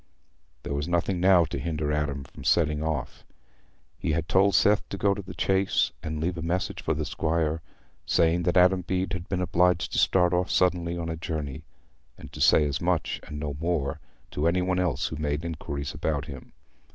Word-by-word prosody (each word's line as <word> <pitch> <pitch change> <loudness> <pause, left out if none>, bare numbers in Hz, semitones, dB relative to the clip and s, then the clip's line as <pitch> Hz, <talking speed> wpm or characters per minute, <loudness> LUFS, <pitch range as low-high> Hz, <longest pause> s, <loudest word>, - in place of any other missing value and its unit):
There - - -4
was 70 +2 -2
nothing 85 +1 0
now 90 -2 +5
to 75 - -5
hinder 75 0 -2
Adam 75 -2 -1
from 65 - -13
setting 75 -3 +2
off. 80 -4 -3 0.8
He - - -1
had 80 +1 -1
told 95 +1 +3
Seth 105 +3 +3
to 100 - -5
go 100 +1 +2
to 100 - -5
the 95 -1 -10
Chase 95 0 +1
and 80 0 -4
leave 85 +2 -2
a - - -4
message 85 +3 -2
for - - -1
the - - -2
squire, 80 0 -1 0.4
saying 85 +1 +2
that 90 - +1
Adam 90 +1 +5
Bede 90 +2 -2
had 90 +1 -5
been 95 -2 -1
obliged 90 -1 +2
to - - +1
start 90 -2 +3
off 90 +1 +1
suddenly 85 -2 +1
on 85 -1 -4
a 80 - -2
journey—and 70 -5 -8
to - - -7
say 75 - +5
as 70 -1 -2
much, 85 -1 0
and 75 - -6
no 75 -2 -4
more, 80 -5 -1 0.3
to 75 +3 0
any 90 +2 +2
one 90 0 0
else 90 -3 0
who 75 - -6
made 75 +1 -2
inquiries 70 -3 -4
about 75 -1 -2
him. 70 -4 -10
85 Hz, 200 wpm, -27 LUFS, 75-90 Hz, 0.8 s, now